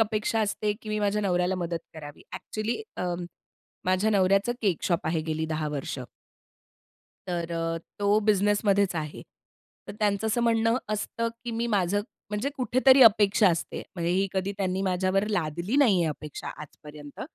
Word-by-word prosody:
अपेक्षा 220 +1 +1
असते, 210 0 0
की 215 - -9
मी 215 0 -1
माझ्या 205 0 +1
नवऱ्याला 180 -1 +1
मदत 170 -2 -2 0.2
करावी. 145 -2 -10
ॲक्चुअली 220 - -4
अ, 180 -1 -1 0.7
माझ्या 185 +4 +2
नवऱ्याचं 195 +3 +3
केक 190 -6 +1
शॉप 170 -1 0
आहे 160 0 0
गेली 160 0 -2
10 155 -1 -2
वर्ष. 140 -2 -4 1.3
तर 170 -1 -2
अ, 165 0 -1 0.2
तो 205 +1 +3
बिझनेसमध्येच 200 -1 +3
आहे. 150 -1 -5 0.7
तर - - -5
त्यांचं 205 0 +1
असं 235 +2 +1
म्हणणं 230 0 +3 0.2
असतं, 230 +2 -2 0.2
की 240 - -3
मी 230 +1 -1
माझं 195 +2 +1 0.3
म्हणजे 210 +7 -1
कुठेतरी 260 +2 +5
अपेक्षा 210 -2 +6
असते. 165 - -3
म्हणजे 170 -1 -1
ही 195 +2 +2
कधी 190 +1 -1
त्यांनी 190 -1 -1
माझ्यावर 190 +1 +1
लादली 175 - -1
नाही 230 -11 +5
आहे 160 - +1
अपेक्षा 150 0 -6
आजपर्यंत. 150 0 -12
195 Hz, 155 wpm, -27 LUFS, 170-215 Hz, 1.3 s, अपेक्षा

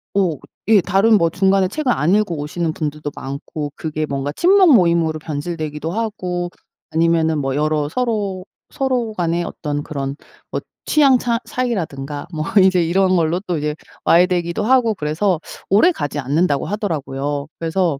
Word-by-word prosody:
오. 180 -8 +1 0.3
예 215 -3 +7
다른 205 +5 +4
뭐 170 -2 +2
중간에 190 +1 +2
책을 265 +5 -1
안 170 -1 +2
읽어 210 -5 +1
오시는 160 +3 -2
분들도 150 -1 -4
많고 145 +2 -6
그게 155 -1 -3
뭔가 140 0 -3
친목 370 - +5
모임으로 170 -5 +3
변질되기도 155 0 -4
하고 180 -5 -3 0.4
아니면은 160 -1 +2
뭐 135 -1 -1
여러 150 0 0
서로, 205 -4 -2 0.2
서로 255 -4 -1
간에 170 -2 0
어떤 145 -3 -4
그런 140 -2 -4 0.4
뭐 - - -2 0.2
취향 275 -4 +5
차 235 -1 0
차이라든가 155 - -3
뭐 155 -1 -2 0.2
이제 185 -2 +4
이런 185 +2 +2
걸로 170 +2 +1
또 175 -4 -1
이제 150 0 -2 0.3
와해되기도 175 +2 +3
하고 235 -1 +3
그래서 170 +3 0 0.3
오래 215 - +5
가지 145 - -4
않는다고 145 +2 +1
하더라고요. 145 -8 -3
그래서 165 -3 0
170 Hz, 335 characters per minute, -19 LUFS, 150-200 Hz, 0.4 s, 예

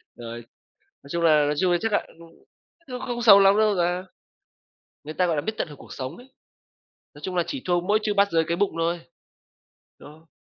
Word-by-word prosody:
Rồi, 115 -1 -8 0.7
nói 140 - -15
chung 170 0 -2
là 155 -3 +5
nói 150 - 0
chung 185 -1 +2
chắc 225 -1 -2
ạ - - +1
ưm, 170 0 -14 0.6
nhưng 250 -1 -6
không 240 -1 -4
xấu 200 -4 +8
lắm 195 +1 +5
đâu 215 -1 +3
ta. 175 +2 0 1.0
Người 155 - -7
ta 180 - +1
gọi 165 - 0
là 145 - -1
biết 220 +8 -3
tận - - -2
hưởng 145 - -12
cuộc - - -12
sống 135 +5 -6
ấy, 260 +2 -17 0.8
nói 145 - -15
chung 185 +2 -4
là 175 - +2
chỉ 275 - -5
thua 175 -1 +1
mỗi 205 +4 +1
Trư 210 - 0
Bát 200 0 +2
Giới 165 -1 +3
cái 170 - -1
bụng 200 +1 +1
thôi. 170 +1 0 1.0
Đó. 155 +3 -15
175 Hz, 220 wpm, -24 LUFS, 160-205 Hz, 1.0 s, xấu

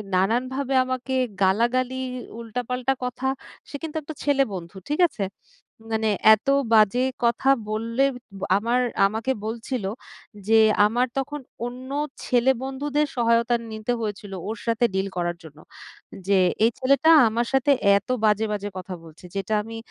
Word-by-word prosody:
নানানভাবে 255 +8 0
আমাকে 255 0 -3 0.3
গালাগালি, 240 +6 +2 0.4
উল্টা, 235 +1 -4
পাল্টা 250 +1 0
কথা, 250 +1 -3 0.4
সে - - -8
কিন্তু 320 -1 -6
একটা 315 +1 -8
ছেলে 280 -1 +3
বন্ধু। 175 -1 -7
ঠিক 300 +4 -1
আছে? 200 - -4 0.7
মানে 220 -1 +1 0.3
এত 215 - -20 0.3
বাজে 220 +3 +5 0.2
কথা 235 +3 +2 0.2
বললে 230 +4 0 0.5
আমার 235 +4 +1 0.3
আমাকে 225 +6 -2
বলছিলো 225 -2 -3 0.6
যে 225 0 +5 0.3
আমার 240 +4 +1
তখন 290 +2 -4 0.2
অন্য 250 +2 -7 0.4
ছেলেবন্ধুদের 265 +4 +1
সহায়তা 235 0 +2 0.2
নিতে 220 +3 -2
হয়েছিলো 205 -2 -5
ওর 225 - -4
সাথে 230 +1 +2
ডিল 190 +1 0
করার 175 -1 -1
জন্য। 155 -2 -13 0.7
যে 200 -1 +4 0.3
এই 230 - +3
ছেলেটা 275 +5 +3 0.2
আমার 230 +2 -1
সাথে 270 +2 +3 0.3
এত 205 - -7 0.2
বাজে, 215 +1 +3
বাজে 205 0 -3
কথা 185 0 -6
বলছে 165 +2 -14
যেটা 195 +2 -2
আমি 225 +1 -8
235 Hz, 140 wpm, -24 LUFS, 210-260 Hz, 0.7 s, বাজে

